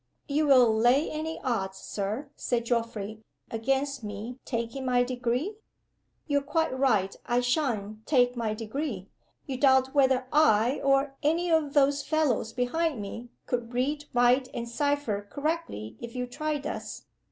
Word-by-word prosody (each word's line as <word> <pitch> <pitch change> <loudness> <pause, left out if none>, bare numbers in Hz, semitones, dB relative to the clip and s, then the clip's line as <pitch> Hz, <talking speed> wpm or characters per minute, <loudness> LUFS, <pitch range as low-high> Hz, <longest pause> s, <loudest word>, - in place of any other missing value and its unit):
"You 300 +1 +1
will 250 -5 +6
lay 245 +7 +3
any 315 +1 -4
odds, 195 -7 -1
Sir," 215 +9 -4
said 235 -2 -1
Geoffrey 225 -3 -2 0.3
"against 270 +3 -1
me 215 +5 -6
taking 235 +2 -3
my 250 -1 +3
Degree? 250 - -2 0.7
You're 285 -2 +1
quite 300 0 0
right. 220 -8 +2
I 240 +1 +2
sha'n't 225 -6 -1
take 250 -4 +3
my 225 -3 -1
Degree. 220 -3 -4 0.4
You 265 -3 -4
doubt 265 -1 +4
whether 265 -2 +3
I, 255 -4 +4
or 275 0 +2
any 335 +4 +1
of 305 -3 +2
those 285 0 +4
fellows 295 -9 0
behind 265 +4 0
me, 225 +4 -7 0.2
could 240 -1 -3
read, 290 +4 0
write, 245 +2 +4
and 235 - -3
cipher 240 -5 -1
correctly 285 - -3
if 235 0 -8
you 250 0 -1
tried 295 +3 -3
us. - - -5
255 Hz, 145 wpm, -28 LUFS, 230-285 Hz, 0.7 s, will